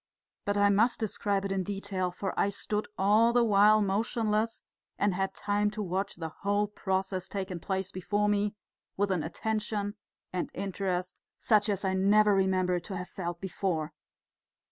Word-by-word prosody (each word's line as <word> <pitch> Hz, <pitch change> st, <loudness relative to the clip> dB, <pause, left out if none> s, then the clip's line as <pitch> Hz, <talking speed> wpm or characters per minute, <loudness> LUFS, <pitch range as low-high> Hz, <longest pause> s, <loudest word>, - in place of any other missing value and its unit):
But 205 Hz, 0 st, 0 dB
I 205 Hz, 0 st, +5 dB
must 225 Hz, +5 st, +3 dB
describe 205 Hz, -2 st, -1 dB
it 195 Hz, -, -2 dB
in 195 Hz, -1 st, 0 dB
detail, 195 Hz, -1 st, -2 dB
for 190 Hz, +2 st, -4 dB
I -, -, +2 dB
stood 210 Hz, +1 st, -3 dB
all 215 Hz, +4 st, +4 dB
the 240 Hz, 0 st, +4 dB
while 210 Hz, 0 st, +5 dB
motionless, 215 Hz, +2 st, 0 dB, 0.3 s
and 205 Hz, -1 st, +2 dB
had 190 Hz, +1 st, -2 dB
time 205 Hz, 0 st, +1 dB
to 210 Hz, -, -1 dB
watch 190 Hz, +2 st, -2 dB
the 160 Hz, -2 st, -6 dB
whole 205 Hz, +1 st, +2 dB
process 190 Hz, -2 st, -2 dB
taking 190 Hz, -3 st, -4 dB
place 190 Hz, +2 st, -2 dB
before 205 Hz, +3 st, 0 dB
me 205 Hz, 0 st, +1 dB, 0.4 s
with 200 Hz, 0 st, +1 dB
an 180 Hz, -3 st, +1 dB
attention 210 Hz, +4 st, -2 dB, 0.4 s
and 180 Hz, -, -2 dB
interest 185 Hz, -2 st, -3 dB, 0.2 s
such 215 Hz, -1 st, +3 dB
as 200 Hz, -1 st, -1 dB
I 190 Hz, -, +1 dB
never 205 Hz, +2 st, +4 dB
remember 185 Hz, -2 st, +2 dB
to 190 Hz, +2 st, -6 dB
have 180 Hz, 0 st, -6 dB
felt 175 Hz, -2 st, -5 dB
before. 175 Hz, -5 st, -2 dB
200 Hz, 165 wpm, -29 LUFS, 190-210 Hz, 0.4 s, I